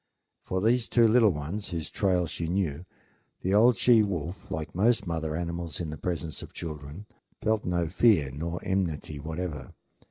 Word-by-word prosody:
For 95 Hz, 0 st, -2 dB
these 115 Hz, +2 st, +2 dB
two 120 Hz, -2 st, +5 dB
little 110 Hz, -1 st, +5 dB
ones, 85 Hz, +6 st, -4 dB
whose 85 Hz, -3 st, -4 dB
trail 90 Hz, -3 st, +1 dB
she 80 Hz, +1 st, -4 dB
knew, 85 Hz, -3 st, -1 dB, 0.6 s
the 95 Hz, -, 0 dB
old 115 Hz, +3 st, +6 dB
she 120 Hz, -3 st, +6 dB
wolf, 90 Hz, -3 st, -3 dB
like 80 Hz, -1 st, -4 dB
most 105 Hz, +3 st, +2 dB
mother 80 Hz, -2 st, -2 dB
animals 85 Hz, -2 st, -3 dB
in 80 Hz, -3 st, -3 dB
the -, -, -5 dB
presence 85 Hz, -3 st, -3 dB
of -, -, -10 dB
children, 75 Hz, +3 st, -7 dB, 0.3 s
felt 110 Hz, -1 st, 0 dB
no 85 Hz, -1 st, 0 dB
fear 85 Hz, -, +3 dB
nor 85 Hz, +5 st, -4 dB
enmity 80 Hz, -6 st, -2 dB
whatever. 80 Hz, -3 st, -5 dB
85 Hz, 165 wpm, -28 LUFS, 80-100 Hz, 0.6 s, old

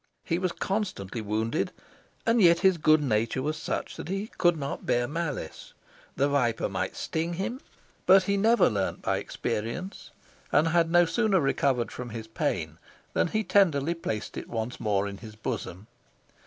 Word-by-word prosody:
He 165 Hz, -, -1 dB
was 185 Hz, -1 st, 0 dB
constantly 185 Hz, -, -3 dB
wounded, 110 Hz, +2 st, -1 dB, 0.5 s
and 230 Hz, 0 st, +3 dB
yet 170 Hz, -2 st, +6 dB
his 190 Hz, -3 st, +4 dB
good 155 Hz, 0 st, +4 dB
nature 115 Hz, +1 st, 0 dB
was 155 Hz, +2 st, -1 dB
such -, -, -4 dB
that -, -, -6 dB
he 195 Hz, +4 st, -3 dB
could 175 Hz, -1 st, +4 dB
not 140 Hz, -2 st, -4 dB
bear 120 Hz, 0 st, +2 dB
malice: 155 Hz, 0 st, -5 dB, 0.4 s
the 140 Hz, -, +2 dB
viper 125 Hz, -5 st, +1 dB
might -, -, -3 dB
sting 165 Hz, +2 st, -2 dB
him, 215 Hz, -, -3 dB, 0.5 s
but 190 Hz, 0 st, +7 dB
he 200 Hz, +2 st, +1 dB
never 225 Hz, +4 st, +4 dB
learned 100 Hz, -3 st, -2 dB
by -, -, +1 dB
experience, 120 Hz, -, -4 dB, 0.4 s
and 155 Hz, +3 st, +4 dB
had 165 Hz, 0 st, +3 dB
no 175 Hz, +1 st, +5 dB
sooner 210 Hz, +1 st, +2 dB
recovered 135 Hz, -4 st, +1 dB
from 125 Hz, -1 st, -6 dB
his 110 Hz, -1 st, -6 dB
pain 110 Hz, -, -2 dB, 0.3 s
than -, -, +2 dB
he 215 Hz, +5 st, -1 dB
tenderly 170 Hz, -7 st, +3 dB
placed 110 Hz, -11 st, -4 dB
it -, -, -6 dB
once 115 Hz, +1 st, -3 dB
more 100 Hz, -1 st, +1 dB
in 100 Hz, 0 st, -7 dB
his 110 Hz, -2 st, -10 dB
bosom. 110 Hz, -4 st, -5 dB
150 Hz, 170 wpm, -27 LUFS, 115-185 Hz, 0.5 s, but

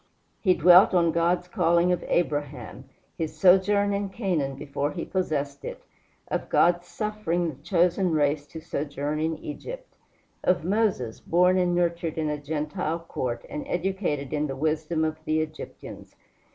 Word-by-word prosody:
He 185 Hz, -3 st, +3 dB
dwelt 180 Hz, +3 st, +7 dB
on 170 Hz, -2 st, +4 dB
God's 170 Hz, +2 st, +1 dB
calling 175 Hz, -2 st, +2 dB
of 180 Hz, -, 0 dB
Abraham, 145 Hz, -7 st, -2 dB, 0.3 s
his 155 Hz, -1 st, -3 dB
sojourn 195 Hz, +3 st, +4 dB
in 200 Hz, 0 st, -2 dB
Canaan 175 Hz, -, -1 dB
before 140 Hz, +1 st, -3 dB
he 165 Hz, -, -4 dB
possessed 145 Hz, -6 st, -2 dB
it; -, -, -7 dB, 0.4 s
of -, -, -3 dB
God's 175 Hz, 0 st, +3 dB
suffering 195 Hz, -5 st, -2 dB
the 140 Hz, -1 st, -16 dB
chosen 180 Hz, +2 st, +2 dB
race 145 Hz, -1 st, +1 dB
to 160 Hz, -, -8 dB
sojourn 145 Hz, 0 st, -3 dB
in 160 Hz, 0 st, -1 dB
Egypt; -, -, -8 dB, 0.5 s
of 180 Hz, -3 st, +2 dB
Moses, 190 Hz, -, 0 dB
born 180 Hz, +2 st, +3 dB
and 175 Hz, -1 st, +2 dB
nurtured 170 Hz, -2 st, 0 dB
in 155 Hz, -1 st, 0 dB
a 150 Hz, -1 st, -4 dB
Gentile 155 Hz, +3 st, -2 dB
court, 125 Hz, -8 st, -4 dB
and 150 Hz, -, -5 dB
educated 175 Hz, -7 st, -2 dB
in 150 Hz, 0 st, 0 dB
the 135 Hz, -, -4 dB
wisdom 155 Hz, +2 st, 0 dB
of 155 Hz, 0 st, -4 dB
the 155 Hz, 0 st, +1 dB
Egyptians. 155 Hz, 0 st, -7 dB
165 Hz, 150 wpm, -26 LUFS, 150-180 Hz, 0.5 s, dwelt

